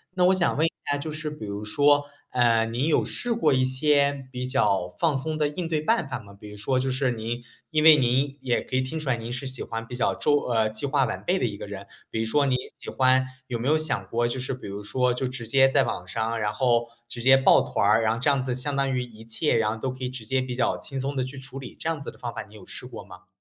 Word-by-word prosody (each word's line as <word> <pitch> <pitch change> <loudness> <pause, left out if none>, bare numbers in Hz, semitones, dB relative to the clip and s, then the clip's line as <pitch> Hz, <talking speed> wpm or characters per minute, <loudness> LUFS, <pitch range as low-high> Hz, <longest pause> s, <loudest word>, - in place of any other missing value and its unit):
那 180 -1 +3
我 185 - +6
想 175 -5 +1
问 160 - +3
一 165 - 0 0.2
下 145 - +2
就 155 +2 -5
是 155 0 -4
比 150 -8 -8
如 100 +1 -5
说， 145 +5 +3 0.2
呃， 115 -2 +3
您 120 +6 -1
有 160 - +3
试 240 -1 -1
过 155 -10 +3
一 130 0 +3
些， 140 0 +2
比 125 0 -4
较 100 -9 +1
放 155 - 0
松 155 +3 -1
的 150 -1 +2
应 165 +3 -4
对 155 -2 +1
办 175 0 +1
法 125 - -2
吗？ 100 -3 -14
比 105 +1 -12
如 105 - -10
说 130 +5 0
就 130 +1 -1
是 130 -1 +1
您 120 +1 -4 0.3
因 155 -1 +1
为 160 -1 +10
您 135 +2 +2
也 125 -2 0
可 130 - -5
以 130 - +3
听 155 +5 -4
出 145 -3 -4
来 125 - +3
您 115 +1 -6
是 130 +2 -4
喜 130 -1 -5
欢 115 0 -5
比 125 - -7
较 125 - +1
周 145 -1 +2
呃， 110 -3 +1
计 110 +6 -4
划 135 -2 +2
完 - - -4
备 185 +2 +1
的 125 - 0
一 105 -3 -2
个 100 - -8
人。 100 -1 -7 0.2
比 110 - -3
如 115 - 0
说 140 +4 +2
你 130 - +2 0.2
喜 - - -8
欢 130 0 +3 0.2
有 120 -3 -4
没 125 - -2
有 155 +1 +4
想 155 -1 -2
过 120 +1 0
就 125 +2 -3
是 130 0 -3
比 - - -12
如 100 +1 -6
说， 125 +3 +1
就 125 +1 -2
直 125 -2 -6
接 135 +3 +5
在 - - +4
网 90 - -4
上， 115 +3 -2
然 105 0 0
后 120 -1 +2 0.2
直 120 0 -7
接 130 +2 +7
报 135 - +6
团 100 - 0
儿。 110 +2 +5
然 110 0 +2
后 115 - -2
这 135 - -1
样 140 -2 +3
子 125 -1 -2
相 140 +2 -3
当 135 -1 +1
于 125 - 0
一 110 -2 -12
切， 115 +7 0
然 110 -2 +2
后 110 - -3
都 130 +3 -2
可 130 0 -8
以 125 - -1
直 125 -4 -8
接 130 +3 +1
比 125 -1 -4
较 125 - 0
轻 135 -1 -5
松 140 +2 -2
地 130 - 0
去 130 +2 -7
处 135 0 -8
理， 125 - -9
这 - - -4
样 160 -3 -1
子 - - -6
的 - - -13
方 120 -1 -5
法 - - -4
你 105 0 -14
有 100 - -12
试 125 - -7
过 115 - -9
吗？ 90 -1 -14
130 Hz, 320 characters per minute, -25 LUFS, 115-140 Hz, 0.3 s, 为